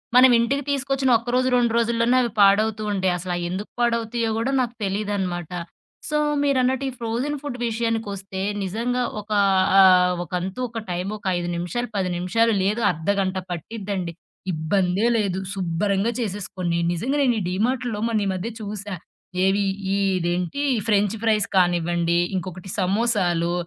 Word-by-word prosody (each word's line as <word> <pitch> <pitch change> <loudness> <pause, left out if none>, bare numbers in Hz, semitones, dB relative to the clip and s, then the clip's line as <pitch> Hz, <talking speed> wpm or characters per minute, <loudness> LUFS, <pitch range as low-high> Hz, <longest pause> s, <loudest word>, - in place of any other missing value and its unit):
మనం 255 0 +8
ఇంటికి 275 +5 0
తీసుకొచ్చిన 275 -1 0
ఒక్కరోజు, 245 +2 0
2 240 -2 +2
రోజుల్లోనే 235 +1 +2
అవి 235 -3 -1
పాడవుతూ 215 +2 +4
ఉంటాయి. 190 -2 +1
అసలయ్యెందుకు 175 +2 -4
పాడవుతాయో 230 -1 0
గూడా 235 +4 0
నాకు 240 -2 -2
తెలీదనమాట. 195 -4 -2 0.6
సో 300 - +1 0.3
మీరన్నట్టు 265 -1 +1
ఈ - - -5
ఫ్రోజెన్ 240 +6 -2
ఫుడ్ 285 -4 -5
విషయానికొస్తే 220 -4 -3 0.2
నిజంగా 235 +6 -1 0.2
ఒక 210 +1 -15 0.5
ఆహ్, 180 -1 +6
ఒకంతు 180 +5 -4
ఒక 225 0 -5
టైమొక 195 +4 -4
5 175 0 -3
నిమిషాలు, 180 +9 -3
10 185 -2 0
నిమిషాలు 225 +6 +2
లేదు 210 +4 0
అర్ధగంట 190 +3 -1
పట్టిద్దండి. 190 0 -4 0.4
ఇబ్బందే 180 +5 +1
లేదు. 195 -4 0
శుబ్బరంగా 195 +4 0
చేసేసుకోండి. 190 -5 -2 0.2
నిజంగా 255 - -1
నేనీ 245 -4 +2
డీమార్ట్‌లో 230 +3 -1
మొన్న 215 -3 0
ఈ - - 0
మధ్య 185 +5 -3
చూసా. 205 -1 -5 0.5
ఏవి 200 +1 +2 0.3
ఈ - - +1 0.2
ఇదేంటి 175 +8 -1 0.3
ఫ్రెంచ్ 205 -1 +2
ప్రైస్ 215 -2 +3
కానివ్వండి, 175 -1 +2 0.2
ఇంకొకటి 185 +1 -5
సమోసాలు, 185 -4 +1
205 Hz, 130 wpm, -23 LUFS, 180-235 Hz, 0.6 s, మనం